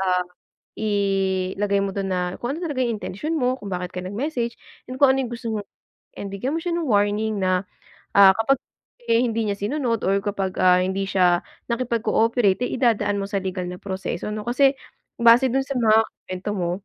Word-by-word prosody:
ah, 180 -1 +2 0.5
ilagay 195 -1 0
mo 195 -1 -2
dun 195 -1 -2
na 180 0 -1
kung 240 - -3
ano - - -6
talaga 290 -6 -1
yung 230 -4 -1
intensyon 300 - -4
mo, 250 0 +1
kung 205 -6 -9
bakit 180 0 -4
ka 180 - -2
nag-message, 235 +4 -3 0.4
kung 280 - +7
ano 270 - 0
yung 245 - -6
gusto 235 0 -6
mong 210 -2 -3 0.5
and 200 - -6
bigyan 225 +9 -3
mo 330 - -2
siya 345 -1 -2
ng 330 - -2
warning 205 -1 +1
na, 185 0 +1 0.5
ah, 195 -1 +8
kapag 235 +6 +2 0.5
eh 230 - +5
hindi 230 -2 0
niya 200 -1 -2
sinunod 230 +1 -1
or 195 +1 +3
kapag, 195 -2 -2
ah, 180 0 +6
hindi 190 +1 -1
siya 180 -2 +3 0.3
nakipag-cooperate, 230 -2 +1
eh, - - -4
idadaan 210 -5 +2
mo - - -3
sa 200 - 0
legal 185 -1 -3
na 180 - -6
proseso, 190 0 -4
'no. 215 - -4
Kasi, 270 +3 +3 0.4
base 235 +2 +6
dun 270 +2 +1
sa 275 - -4
mga 220 -2 +5 0.3
kuwento 185 +2 -4
mo, 175 -3 -1
205 Hz, 190 wpm, -23 LUFS, 190-240 Hz, 0.5 s, ah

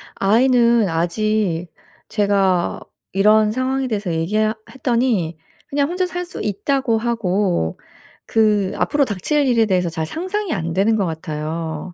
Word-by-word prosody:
아이는 235 0 +3
아직 175 +1 0 0.4
제가 195 -4 +1 0.3
이런 210 +2 +4
상황에 260 +2 -1
대해서 205 -6 -2
얘기 165 +6 -2
하 215 0 +2 0.2
했더니 235 - 0 0.3
그냥 280 +1 0
“혼자 365 +1 0
살 355 +1 -4
수 350 - -8
있다.“고 230 +3 0
하고 200 - 0 0.5
그 210 -3 +2
앞으로 290 -2 +2
닥칠 265 - 0
일에 230 -3 +3
대해서 180 -4 +1
잘 160 -1 -3
상상이 375 - -3
안 165 -3 -3
되는 205 +4 +2
것 200 -3 +1
같아요. 160 +1 -4
210 Hz, 270 characters per minute, -20 LUFS, 180-250 Hz, 0.5 s, 이런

